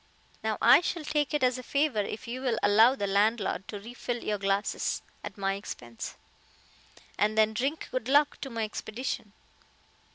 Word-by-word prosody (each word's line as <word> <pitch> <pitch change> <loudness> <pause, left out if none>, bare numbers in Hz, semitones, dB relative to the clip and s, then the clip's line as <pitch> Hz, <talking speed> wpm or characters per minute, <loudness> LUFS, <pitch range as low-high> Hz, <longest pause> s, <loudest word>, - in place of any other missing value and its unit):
Now, - - 0
I - - +8
shall 340 -1 -2
take 295 -1 0
it 295 -3 0
as 255 0 +2
a - - -5
favor 280 -2 0
if 210 +3 -6
you'll 250 -1 -1
allow 220 +5 +6
the 205 - -2
landlord 200 0 +1
to 205 - -6
re 230 +4 -10
fill 245 -1 -4
your 210 -1 -1
glasses 195 +1 -1 0.2
at - - -7
my 195 -1 0
expense, 120 - -7 1.0
and 215 +1 +2
then 220 0 +4
drink 270 +8 -2
good 255 -2 -2
luck 290 +1 +3
to 270 - -4
my 230 -2 -3
expedition." 220 0 -4
225 Hz, 170 wpm, -29 LUFS, 205-260 Hz, 1.0 s, I